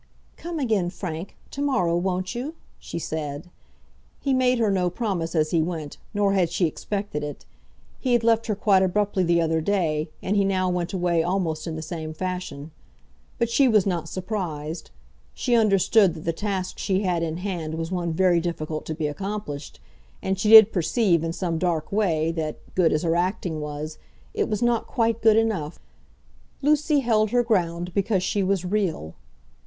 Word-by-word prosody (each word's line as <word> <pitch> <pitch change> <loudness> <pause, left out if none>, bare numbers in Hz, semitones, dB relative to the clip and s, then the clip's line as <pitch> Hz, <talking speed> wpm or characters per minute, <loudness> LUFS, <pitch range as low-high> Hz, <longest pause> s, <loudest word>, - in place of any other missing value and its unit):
"Come 340 0 -6
again, 220 - +1
Frank, 175 -1 -6
to 280 - -5
morrow, 250 -13 +1
won't 185 +1 -1
you?" 270 +7 -5 0.2
she - - -7
said. 155 0 -5 0.7
He 275 - 0
made 255 -1 +3
her 220 -3 +2
no 180 -2 +1
promise 180 -5 -2
as 155 -1 +2
he 165 - +3
went, 160 -3 -4
nor 205 -1 +1
had 185 -4 +2
she 175 +2 +1
expected 195 0 -3
it. 145 -1 -7 0.5
He 255 -2 0
had 240 -1 +3
left 230 0 +3
her 215 - 0
quite 195 -2 +3
abruptly 195 +1 +1
the 170 -1 +3
other 160 -1 +1
day, 160 -4 0
and 200 - 0
he 200 - +4
now 185 -1 +1
went 175 -1 -2
away 175 -3 +1
almost 170 -2 -1
in 160 - -3
the 160 - -5
same 160 -1 -6
fashion. 180 -5 -5 0.7
But 235 0 0
she 270 +3 +4
was 215 -5 +4
not 170 -4 -2
surprised. 170 -5 -4 0.5
She 245 - -1
understood 200 -3 +4
that 160 - -9
the 165 - 0
task 195 0 -3
she 195 0 0
had 180 -3 0
in 165 -1 -2
hand 175 -4 -4
was 165 +1 -4
one 175 -2 -1
very 175 +1 +3
difficult 155 -2 -4
to 160 - -3
be 155 -1 -2
accomplished, 150 -3 -5 0.4
and 190 0 -2
she 210 - +1
did 220 -1 +10
perceive, 175 -1 +2
in 165 - -1
some 165 -1 -2
dark 165 -3 -1
way, 165 -6 +1
that, 160 -2 -3 0.2
good 175 -3 +3
as 155 +2 0
her 165 -1 +1
acting 175 -2 -1
was, 150 +1 -6 0.3
it - - -1
was 215 +1 -1
not 240 -1 +1
quite 230 -2 0
good 220 -1 +5
enough. 200 -9 0 0.8
Lucy 300 0 +3
held 215 -3 +2
her 245 +2 +2
ground 175 -6 0
because 200 -1 +1
she 200 +2 0
was 190 -1 0
real. 180 - -1
180 Hz, 180 wpm, -24 LUFS, 165-210 Hz, 0.8 s, did